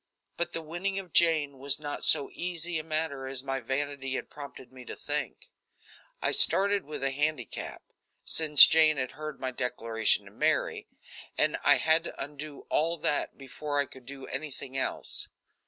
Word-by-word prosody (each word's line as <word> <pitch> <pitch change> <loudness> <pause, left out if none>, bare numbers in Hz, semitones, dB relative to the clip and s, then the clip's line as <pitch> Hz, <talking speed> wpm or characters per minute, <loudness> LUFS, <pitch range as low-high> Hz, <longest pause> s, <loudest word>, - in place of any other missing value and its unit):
But 170 0 -3
the 165 - -4
winning 175 +5 -4
of 185 -4 -7
Jane 155 -5 +2
was 140 +1 +1
not 145 -1 -6
so 145 -3 +5
easy 175 -1 -1
a - - -6
matter 155 -4 -3
as 135 -1 -1
my 135 -1 -3
vanity 135 +1 -4
had - - -6
prompted 140 -3 -11
me 130 -1 -12
to - - -8
think. 150 0 -5 0.7
I - - +1
started 200 -1 +4
with 150 -2 -7
a 135 - 0
handicap, 145 -3 -4 0.4
since 150 -3 +9
Jane 155 -1 +3
had 130 -2 -2
heard 155 -1 -8
my 130 -1 -3
declaration 115 -3 0
to - - -14
Mary, - - -1 0.5
and - - +2
I - - +6
had 160 +1 +2
to - - -6
undo 145 +1 -8
all 165 +2 +1
that 150 - -1
before 145 +2 -6
I 145 - +2
could 130 -2 -16
do 135 -1 -9
anything 135 -1 -7
else. 135 - -2
145 Hz, 170 wpm, -28 LUFS, 135-160 Hz, 0.7 s, since